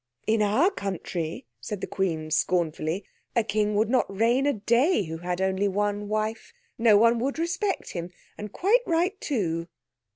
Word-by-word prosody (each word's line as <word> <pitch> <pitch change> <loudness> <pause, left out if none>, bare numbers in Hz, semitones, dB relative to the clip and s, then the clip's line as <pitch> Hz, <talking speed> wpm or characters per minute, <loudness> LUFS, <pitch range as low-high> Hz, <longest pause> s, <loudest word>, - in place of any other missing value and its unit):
"In 220 0 +2
our 220 - +3
country," 180 - -4
said 195 - -5
the - - -3
Queen 160 -5 -2
scornfully, 165 +1 0 0.3
"a 235 - +3
king 210 0 0
would 215 +2 +3
not 255 +3 +1
reign 230 +7 +2
a 285 - +3
day 235 - +2
who 160 -1 -5
had 175 +1 -3
only 190 +1 +1
one 205 +1 -1
wife. 215 +1 -3 0.3
No 225 -3 +6
one 230 +2 +4
would 270 +5 -1
respect 370 +5 -1
him, 170 -1 -5 0.3
and 210 -1 -7
quite 420 - +3
right 355 +4 0
too." 170 - -1
210 Hz, 165 wpm, -26 LUFS, 185-240 Hz, 0.3 s, No